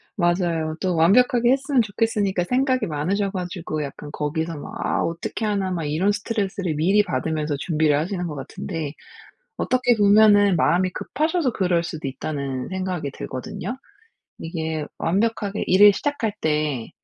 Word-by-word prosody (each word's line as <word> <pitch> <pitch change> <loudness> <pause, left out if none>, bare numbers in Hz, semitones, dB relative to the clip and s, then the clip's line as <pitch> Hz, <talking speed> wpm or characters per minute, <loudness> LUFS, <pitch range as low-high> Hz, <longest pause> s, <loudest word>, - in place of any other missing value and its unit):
맞아요. 175 -3 0
또 185 -2 0
완벽하게 240 - +4
했으면 270 -1 +2
좋겠으니까 205 -3 0
생각이 255 +1 +1
많으셔 185 +7 -1
가지고 175 -5 -4
약간 145 +1 -8
거기서 160 +2 -3
막 145 - -8
'아 - - 0
어떻게 170 +6 -3
하나.' 200 -3 0
막 170 -3 -2
이런 165 +8 +1
스트레스를 200 -5 -2
미리 195 +7 +3
받으면서 155 -3 -2
준비를 155 -1 +2
하시는 180 +3 -2
것 155 -3 -5
같은데 145 +2 -5 0.6
어떻게 250 -2 +2
보면은 205 -2 +5
'마음이 185 +3 +2
급하셔서 310 - -1
그럴 180 -5 +1
수도 160 -4 -5
있다.'는 135 -1 -4
생각이 185 -6 -3
들거든요. 130 - -6 0.6
이게 160 -2 -3
완벽하게 205 +2 0
일을 205 +2 +7
시작할 285 -6 -1
때 150 -6 -1
180 Hz, 350 characters per minute, -23 LUFS, 155-210 Hz, 0.6 s, 일을